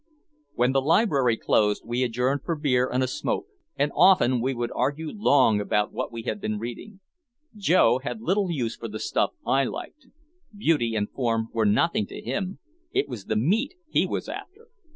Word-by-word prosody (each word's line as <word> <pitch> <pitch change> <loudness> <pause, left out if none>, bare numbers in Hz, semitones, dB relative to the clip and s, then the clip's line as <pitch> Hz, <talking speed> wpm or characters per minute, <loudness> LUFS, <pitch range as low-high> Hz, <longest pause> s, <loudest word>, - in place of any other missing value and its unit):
When 125 +2 +2
the 135 0 +2
library 140 - +3
closed 105 -1 +1
we 120 +2 -2
adjourned 125 +3 0
for 170 - -1
beer 130 -4 +1
and 130 +1 +1
a - - 0
smoke, 130 - -2 0.3
and 145 - 0
often 145 -8 +5
we 130 +2 -1
would 120 0 -3
argue 150 +2 -1
long 130 - +3
about 105 0 0
what - - -4
we 115 -1 -6
had 110 -4 -3
been 110 0 -2
reading. 120 - -8 0.5
Joe 175 - +3
had 145 - -5
little 200 -3 0
use 125 -9 -2
for 115 - -7
the 110 0 -6
stuff - - 0
I 135 +1 +3
liked. 320 -3 -7 0.5
Beauty 145 - +1
and 105 -1 0
form 115 -3 -1
were 110 -2 +2
nothing 105 0 +2
to - - -8
him, 185 - -3 0.3
it - - 0
was 120 -8 -7
"the - - -1
meat" 215 - +1 0.2
he - - +2
was - - -3
after. 450 +5 -9
130 Hz, 185 wpm, -25 LUFS, 115-170 Hz, 0.5 s, often